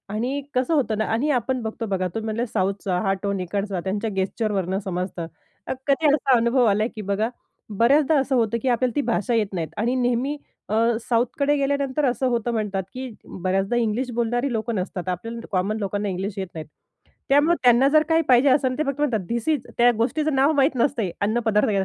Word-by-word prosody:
आणि 260 +6 -1
कसं 255 +6 +1
होतं 240 -8 +1
ना 220 - 0
आणि 275 +7 0
आपण 250 0 0
बघतो 225 +1 -4
बघा 190 -3 -1
तुम्ही 225 0 -4
म्हटले 225 +2 -1
साऊथचा 195 -2 -1
हा 195 -1 +2
टोन 200 -1 -1
इकडचा 195 +1 -2
त्यांच्या 205 +3 -2
गेस्चरवरनं 190 -1 -1
समजतं. 180 -3 -4 0.6
कधी 290 +3 +3
असा 275 -3 +3
अनुभव 235 +2 +3
आला 210 0 +3
की 215 - -5
बघा 205 +3 -1 0.5
बऱ्याचदा 280 +6 +4
असं 270 0 0
होतं, 235 -1 +1
की - - -3
आपल्याला 245 0 +1
ती 290 - +2
भाषा 235 +1 0
येत 220 -3 +2
नाहीत 165 -3 -3
आणि 240 +4 0
नेहमी 250 +4 0 0.3
अ, 215 - 0 0.3
साऊथकडे 250 +5 +1
गेल्यानंतर 280 0 0
असं 255 +1 +1
होतं 240 -1 0
म्हणतात, 205 -4 -1
की 255 0 -5 0.3
बऱ्याचदा 195 +5 0
इंग्लिश 240 +2 0
बोलणारी 240 +3 0
लोकं 225 0 -2
नसतात. 185 -1 -3
आपल्याला 230 +6 -5
कॉमन 195 +3 0
लोकांना 205 0 -2
इंग्लिश 190 +2 -3
येत 190 - -3
नाहीत. 160 -1 -6 0.6
त्यामुळं 290 +5 +4
त्यांना 245 +2 +6
जर 310 - +6
काही 325 0 +4
पाहिजे 255 +2 +5
असेल 260 -1 +2
ते 310 - +1
फक्त 275 0 -3
म्हणतात 225 -10 0
धिस 235 -1 -2
इज. 300 -5 0
त्या 240 +1 +6
गोष्टीचं 295 +6 0
नाव 275 +3 +4
माहीत 275 0 +3
नसते. 230 -10 0
अन्नपदार्थ 220 0 +1
235 Hz, 190 wpm, -23 LUFS, 200-260 Hz, 0.6 s, त्यांना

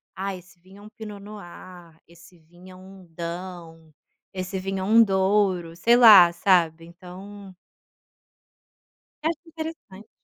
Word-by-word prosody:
Ai 195 0 -5
esse 180 0 -22
vinho 190 +3 -18
é - - -15
um - - -12
Pinot 215 -2 -10
Noir, 180 -4 -13
esse 170 +1 -19
vinho 175 +3 -18
é - - -14
um 190 0 -15
Daou, 170 -1 -9 0.4
esse 185 0 -5
vinho 195 +1 -4
é - - -4
um 225 +4 +5
Douro, 190 -4 0
sei 230 +8 +3
lá, 210 -8 +8
sabe, 170 -2 +1
então 190 +3 -13 1.7
Eu 320 - 0
acho 335 - -6
interessante. 315 -11 -10
185 Hz, 140 wpm, -23 LUFS, 175-205 Hz, 1.7 s, lá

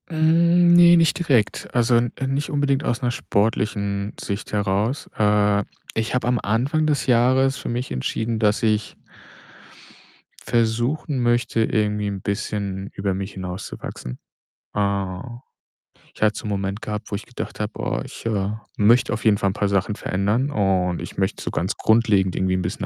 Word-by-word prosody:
Hm, 170 +2 +4
ne, 175 0 +8
nicht 165 -2 +3
direkt. 130 -11 +1
Also, 120 0 +3
n 120 0 +2 0.2
nicht 140 +2 -1
unbedingt 145 -1 +1
aus 120 -3 -1
'ner 120 -1 0
sportlichen 100 -2 -1
Sicht 100 +1 -5
heraus. 105 +6 0
Äh, 105 -1 +3 0.3
ich 110 0 -2
habe 125 -2 0
am 125 -1 +2
Anfang 130 +9 +1
des 150 -2 +1
Jahres 130 +2 +3
für - - -6
mich 120 +2 -3
entschieden, 110 - -2
dass 105 0 +2
ich 110 -1 0 1.5
versuchen 120 +5 0
möchte, 120 -1 +1
irgendwie 105 -1 0
'n 100 -2 -4
bisschen 100 -1 -3
über 95 0 -1
mich 95 +2 -5
hinauszuwachsen. 90 -8 -7 0.6
Äh, 100 -2 -1 1.0
ich - - -17
hatte 105 0 +3
so - - -10
'nen - - -3
Moment 100 +1 -2
gehabt, 105 -1 -5
wo - - -1
ich 110 - -6
gedacht 125 - -7
habe: 105 0 -3
„Oh, - - -1
ich, - - -11
äh, 100 -3 0 0.3
möchte 115 +3 +4
auf 110 - -5
jeden 105 -2 +5
Fall 100 - +1
'n - - -2
paar 105 0 0
Sachen 100 +1 0
verändern 105 +11 0
und 95 -6 +1
ich - - -8
möchte 95 0 -1
so - - -3
ganz 90 +4 -1
grundlegend 105 -5 +3
irgendwie 95 0 0
'n 95 - -1
bisschen 90 +3 -3
105 Hz, 170 wpm, -22 LUFS, 100-125 Hz, 1.5 s, ne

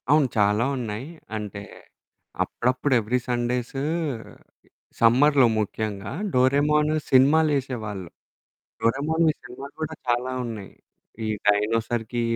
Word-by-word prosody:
అవును. 150 -1 +5
చాలా 105 +2 +3
ఉన్నాయి. 115 +1 -4 0.3
అంటే 105 -1 -6 0.8
అప్పుడప్పుడు 130 +3 0
ఎవ్రీ 115 +3 0
సండేసు 125 +2 -1 1.2
సమ్మర్‌లో 130 +3 +5
ముఖ్యంగా 105 -1 -3 0.2
'డోరేమాను' 150 +4 +3 0.2
సినిమాలేసేవాళ్ళు. 130 - +2 0.7
'డోరేమాన్‌వి'‌ 155 +6 +1
సినిమాలు 135 +3 -10
కూడా 155 0 -3
చాలా 120 +2 +1
ఉన్నాయి. 110 -5 -7 0.5
ఈ - - -2 0.2
డైనోసార్‌కి 115 +3 +1
125 Hz, 85 wpm, -24 LUFS, 110-140 Hz, 1.2 s, అవును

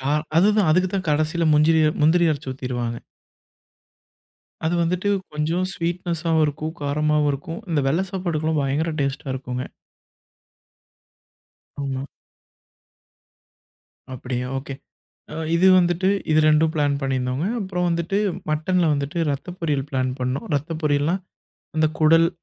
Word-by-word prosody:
கா 135 +2 -1 0.2
அதுதான் 205 +1 +4
அதுக்குதான் 185 +2 +1
கடைசில 155 +2 +1
முந்திரி 160 +2 +4 0.2
முந்திரிய 160 +1 +4
அரச்சி 140 -2 -5
ஊத்திருவாங்க. 120 -3 -4 1.7
அது 170 - +1
வந்துட்டு 180 +4 0 0.2
கொஞ்சம் 160 +5 0
ஸ்வீட்நெஷாவும் 170 -2 -1
இருக்கும், 155 +3 -4
காரமாவும் 150 +1 +1
இருக்கும். 165 +7 -6
இந்த 150 -3 +2
வெள்ள 165 +7 +1
சாப்பாட்டுக்கு 160 -5 -1
பயங்கர 150 +4 0
டேஸ்டா 140 0 -2
இருக்குங்க. 125 -1 -4 2.2
ஆமா. 135 -1 -3 2.1
அப்படியா, 125 0 -4
ஓகே. 135 +1 -7 0.6
அ - - -6 0.2
இது 175 +3 +4
வந்துட்டு 175 +1 +2 0.2
இது 155 0 +5
2டும் 155 +1 +4
பிளான் 145 -2 +1
பண்ணிருந்தோங்க. 130 +1 -1 0.2
அப்பறம் 185 -3 -1
வந்துட்டு, 170 +4 0 0.3
மட்டன்ல 160 +2 +1
வந்துட்டு 140 +4 -3
ரத்த 175 +6 -6
பொரியல் 145 -5 -1
பிளான் 130 -1 0
பண்ணோம். 125 +2 -2
ரத்த 150 +4 -4
பொரியல்னா, 150 +3 +2 0.6
அந்தக் 155 0 +1
குடல் 165 +2 +6
155 Hz, 115 wpm, -23 LUFS, 140-170 Hz, 2.2 s, குடல்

